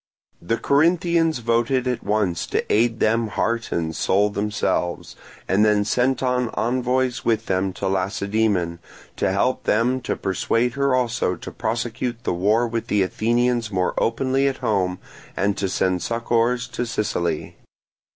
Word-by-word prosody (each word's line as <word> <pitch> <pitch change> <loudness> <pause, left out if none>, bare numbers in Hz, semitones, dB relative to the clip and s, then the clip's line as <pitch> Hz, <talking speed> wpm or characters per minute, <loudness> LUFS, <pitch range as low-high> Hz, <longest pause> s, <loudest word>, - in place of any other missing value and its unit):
The 115 +7 -1
Corinthians 165 +1 +2
voted 120 +2 +1
at 125 -1 -2
once 100 -5 0
to - - -1
aid 115 +1 +2
them 115 +1 +2
heart 115 +2 -1
and 80 -1 -2
soul 100 +5 +2
themselves, 100 -4 -2 0.3
and 100 +3 +3
then 105 -1 +3
sent 125 +4 +1
on 125 -2 +1
envoys 125 +1 0
with 115 -1 +1
them 95 0 0
to - - -3
Lacedaemon, 95 -2 0 0.4
to - - +1
help 100 +7 0
them 125 +4 +2
to - - -2
persuade 115 +5 0
her 140 -1 +1
also 115 -7 0
to - - -9
prosecute 120 +1 -3
the - - 0
war 105 +7 +2
with 115 0 -3
the 105 -2 +2
Athenians 120 +3 0
more 90 -2 0
openly 130 +4 +1
at 135 - -1
home 95 -3 0 0.4
and 100 +1 +1
to 95 - -1
send 95 -1 0
succours 115 +3 0
to 120 0 -3
Sicily. 85 -8 -2
115 Hz, 150 wpm, -22 LUFS, 100-125 Hz, 0.4 s, and